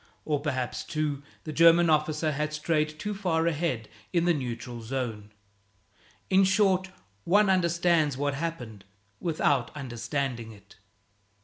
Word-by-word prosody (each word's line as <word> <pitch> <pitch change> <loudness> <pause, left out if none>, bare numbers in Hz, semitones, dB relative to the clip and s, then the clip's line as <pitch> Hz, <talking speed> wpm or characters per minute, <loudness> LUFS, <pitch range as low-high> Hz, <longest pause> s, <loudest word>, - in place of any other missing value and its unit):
Or 150 -2 0
perhaps, 130 -4 -2
too, 150 -2 -2 0.2
the 155 - -6
German 170 +2 +6
officer 155 0 +1
had 150 +1 -2
strayed 155 0 0
too 210 +6 -3
far 175 -5 0
ahead 150 -9 -1 0.2
in 170 -2 +2
the 175 - +4
neutral 120 -3 -5
zone. 115 -3 -4 1.0
In 190 +1 +4
short, 190 -1 +3 0.3
one 200 +2 +4
understands 170 -5 +2
what 145 0 0
happened 135 -10 -5 0.4
without 145 -7 +1
understanding 125 -2 -3
it. 100 -1 -18
155 Hz, 125 wpm, -28 LUFS, 130-170 Hz, 1.0 s, German